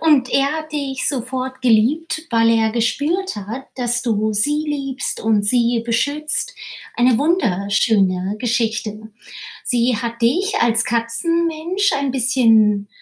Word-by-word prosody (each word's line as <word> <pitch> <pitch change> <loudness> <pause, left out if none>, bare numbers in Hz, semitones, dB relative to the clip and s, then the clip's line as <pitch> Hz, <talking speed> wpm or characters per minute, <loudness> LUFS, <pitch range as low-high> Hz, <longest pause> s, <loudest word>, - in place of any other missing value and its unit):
Und 295 -6 +3
er 275 +1 +2
hat 315 0 -6
dich 275 -3 -3
sofort 260 0 -3
geliebt, 300 +8 +1
weil 230 -1 +3
er 225 -1 +2
gespürt 290 - -1
hat, 220 +7 -7
dass 245 -1 -1
du 215 -2 0
sie 295 +9 +1
liebst 275 -2 -3
und 220 -2 +1
sie 235 +1 +2
beschützt. 295 - -1 0.4
Eine 245 0 +3
wunderschöne 200 - +1
Geschichte. 220 -2 -2 0.5
Sie 240 -1 +1
hat 235 +1 -5
dich 370 - +1
als 235 0 +3
Katzenmensch 335 - 0
ein 280 -1 -1
bisschen, 225 -5 +3
245 Hz, 125 wpm, -19 LUFS, 225-290 Hz, 0.5 s, Und